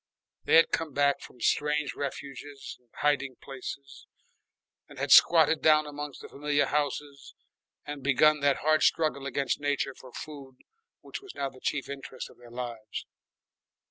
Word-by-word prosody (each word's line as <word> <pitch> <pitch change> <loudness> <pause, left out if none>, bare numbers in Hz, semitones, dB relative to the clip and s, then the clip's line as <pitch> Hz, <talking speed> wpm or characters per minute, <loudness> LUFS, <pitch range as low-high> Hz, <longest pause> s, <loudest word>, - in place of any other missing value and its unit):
They - - +4
had 165 - +6
come 160 -3 -2
back 140 0 +2
from 125 - -13
strange 150 +2 +1
refuges 140 0 -6
and 125 -1 -36
hiding 140 -3 +1
places 135 +1 -9 0.8
and - - -14
had - - -2
squatted 160 -2 +7
down 155 -1 +5
among 145 -1 -6
the - - -10
familiar 145 0 0
houses 145 -1 -3 0.5
and 145 -1 -6
begun 150 +3 +4
that 140 -1 +2
hard 155 0 +4
struggle 155 -4 +2
against 140 0 -1
nature 145 -1 -1
for 130 -1 -14
food 140 -2 -9 0.5
which - - -8
was 395 -2 -12
now 140 -1 -2
the 130 - -17
chief 140 -2 -2
interest 135 -1 -7
of - - -21
their 120 -1 -14
lives. 120 -3 -6
140 Hz, 155 wpm, -28 LUFS, 135-150 Hz, 0.8 s, squatted